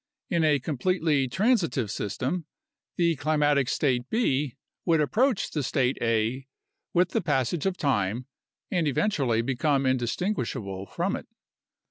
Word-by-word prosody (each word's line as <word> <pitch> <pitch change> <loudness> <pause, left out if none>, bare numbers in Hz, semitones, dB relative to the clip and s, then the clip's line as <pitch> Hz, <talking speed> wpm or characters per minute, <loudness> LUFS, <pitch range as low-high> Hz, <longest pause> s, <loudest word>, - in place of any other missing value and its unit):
In 170 -2 +2
a 150 -2 +4
completely 150 0 0
transitive 180 - +1
system, 130 - -3 0.5
the 170 -2 +2
climatic 145 -2 +2
state 130 -3 0
B 145 - 0 0.3
would 165 -3 +3
approach 225 - +1
the 150 - -1
state 130 0 0
A 115 +3 0 0.4
with 180 0 +3
the - - 0
passage 145 0 0
of 185 -1 -1
time 115 -3 0 0.5
and 170 -4 +1
eventually 135 - +1
become 135 +2 +1
indistinguishable 120 - -1
from - - -1
it. - - -8
140 Hz, 125 wpm, -27 LUFS, 125-170 Hz, 0.5 s, a